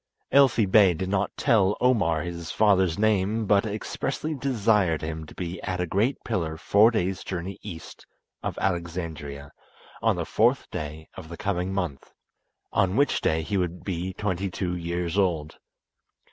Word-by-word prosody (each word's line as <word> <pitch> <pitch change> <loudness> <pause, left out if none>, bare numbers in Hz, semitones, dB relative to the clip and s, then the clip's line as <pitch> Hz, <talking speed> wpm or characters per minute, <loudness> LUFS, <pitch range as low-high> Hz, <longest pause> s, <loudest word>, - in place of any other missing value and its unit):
Elfi 135 -6 +5
Bey 95 -2 +5
did 95 +3 -3
not 100 0 +1
tell 105 -7 +3
Omar 95 -11 +2
his 85 -1 -6
father's 95 -5 +3
name, 110 +1 +1
but 100 +2 +3
expressly 110 +8 -3
desired 105 - +1
him 80 0 -5
to - - -13
be 90 0 -5
at 90 -1 -3
a 90 - +1
great 105 - +1
pillar 85 -8 -2
four 105 +6 +5
days' 95 -5 -1
journey 95 +1 -5
east 90 -6 -10 0.3
of - - -4
Alexandria 85 -6 -3 0.5
on - - +3
the - - -3
fourth - - +2
day 75 +1 -6
of 85 -4 -10
the 85 - -8
coming 95 -2 -1
month, 90 -8 -4 0.6
on 95 -2 +2
which 140 +2 +2
day 80 0 +1
he 100 +5 -1
would 90 -1 -2
be 90 -1 -3
twenty 95 -1 -2
two 90 -1 -3
years 85 +2 -2
old. 80 -5 -1
95 Hz, 160 wpm, -26 LUFS, 85-105 Hz, 0.6 s, Elfi